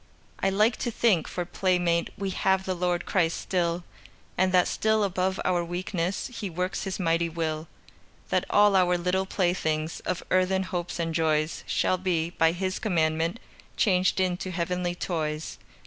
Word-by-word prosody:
I - - +2
like 215 +4 +3
to 240 - -2
think, 215 -7 +2
for 180 - -3
playmate 175 -2 +1
We 195 -1 -2
have 190 0 +1
the 185 - -1
Lord 180 -1 -1
Christ 170 -4 +1
still, 175 -1 -1 0.5
And 185 0 +2
that 180 -1 +4
still 220 0 +1
above 190 -1 0
our 175 -1 +2
weakness 175 +1 -2
He 210 -4 -4
works 180 +3 -2
His 195 0 -3
mighty 170 -1 +1
will, 160 -1 -3 0.6
That - - +1
all 205 -1 +5
our 180 -1 +4
little 180 +2 0
playthings 165 -5 0
Of 180 - -3
earthen 185 +1 +2
hopes 180 -2 -4
and 165 -1 -2
joys 155 -1 0
Shall 185 - +1
be, 170 -3 0
by 165 -2 +3
His 185 +2 -2
commandment, 165 0 0 0.4
Changed 185 -3 +2
into 185 0 0
heavenly 180 0 -2
toys. 155 -3 -3
180 Hz, 160 wpm, -27 LUFS, 170-190 Hz, 0.6 s, all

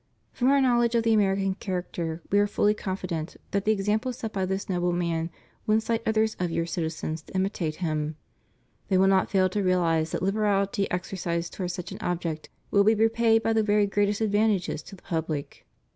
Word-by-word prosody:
From 250 +1 +2
Our 280 0 +5
knowledge 240 -3 +3
of 230 - +3
the 225 0 +3
American 195 -2 +2
character. 175 -4 -4
We 200 - +4
are 205 - +3
fully 205 +1 +2
confident 185 -5 -4
that 200 0 0
the 215 - +4
example 215 +4 0
set 225 -2 -6
by 190 -2 -1
this 190 +1 -2
noble 180 -1 0
man 170 -1 -1 0.4
will 215 - +4
incite 225 +1 0
others 220 0 +2
of 180 -1 0
your 165 0 -1
citizens 160 -2 -3
to 160 - -15
imitate 185 -5 -1
him; 155 -3 -2 0.7
they 190 - +2
will 190 - +5
not 195 -1 +3
fail 190 -1 +3
to 205 +3 -1
reahze 170 -4 +2
that - - -3
Uberahty 200 0 +1
exercised 175 -2 -3
towards 180 -2 -3
such 180 -1 -6
an - - -7
object 165 -3 -3 0.2
will 200 - +5
be 220 +2 +4
repaid 225 +1 +3
by 225 - +2
the 220 - +3
very 210 -1 +3
greatest 205 +1 0
advantages 205 -6 +1
to 195 - -12
the 185 - -20
public. 160 -3 -4
195 Hz, 195 wpm, -26 LUFS, 175-215 Hz, 0.7 s, Our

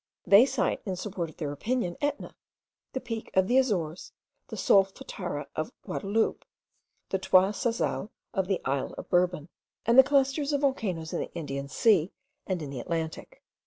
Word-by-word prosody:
They 205 +6 +7
cite, 265 -2 0
in 190 -3 -3
support 180 -3 -4
of 155 - -16
their 150 -3 -3
opinion, 185 - -2
Etna, 290 0 -2 0.6
the 260 - -1
peak 230 -3 -5
of 190 0 +4
the 255 +4 +5
Azores, 180 -10 -1 0.3
the 225 - -7
Solfatara 190 -5 +1
of 155 - -3
Guadaloupe, 210 +3 -1 0.7
the 195 - 0
Trois 190 +1 +4
Salazes 225 0 -1 0.2
of 190 -3 0
the 195 -1 0
isle 135 0 -1
of - - -8
Bourbon, 175 -3 +2 0.4
and 235 +3 +6
the - - +11
clusters 280 +1 +2
of 285 - +1
volcanoes 190 - -1
in - - -1
the - - -5
Indian 140 -4 -4
Sea 185 - +3 0.4
and 185 -4 -2
in 140 - -6
the 135 - -5
Atlantic. 165 - -4
195 Hz, 165 wpm, -28 LUFS, 165-240 Hz, 0.7 s, the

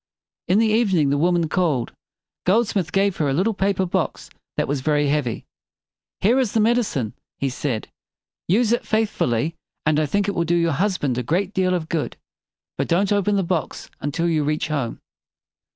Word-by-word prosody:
In 185 - +3
the 225 - +4
evening 200 -10 +2
the 145 - +2
woman 170 0 +2
called. 155 -8 0 0.6
Goldsmith 195 -4 +2
gave 195 -1 +1
her 150 -3 +1
a - - +1
little 190 +10 +1
paper 195 -1 +1
box 175 - -2 0.3
that - - +1
was 140 -1 -1
very 145 0 +2
heavy. 140 -6 -1 0.8
"Here 235 +7 +4
is 250 -6 0
the 225 - +2
med 235 +3 +4
i - - +3
cine," 130 - -3 0.2
he 135 - -1
said. 125 -3 -3 0.6
"Use 220 +5 +3
it 240 - +1
faith 220 -1 +1
ful - - 0
ly, 120 +7 0 0.3
and 155 -1 +3
I 155 - +1
think 200 +7 0
it 200 - 0
will 170 - 0
do 170 +1 +1
your 170 -1 +2
husband 150 - 0
a - - 0
great 180 - -1
deal 185 -2 +2
of 165 -3 -3
good. 160 -3 -2 0.6
But - - 0
don't 190 +4 +2
open 205 0 +2
the 195 - +2
box 170 -2 -3
until 155 +4 -1
you 160 -3 +1
reach 150 +1 -1
home." 140 -7 -2
170 Hz, 200 wpm, -22 LUFS, 150-200 Hz, 0.8 s, the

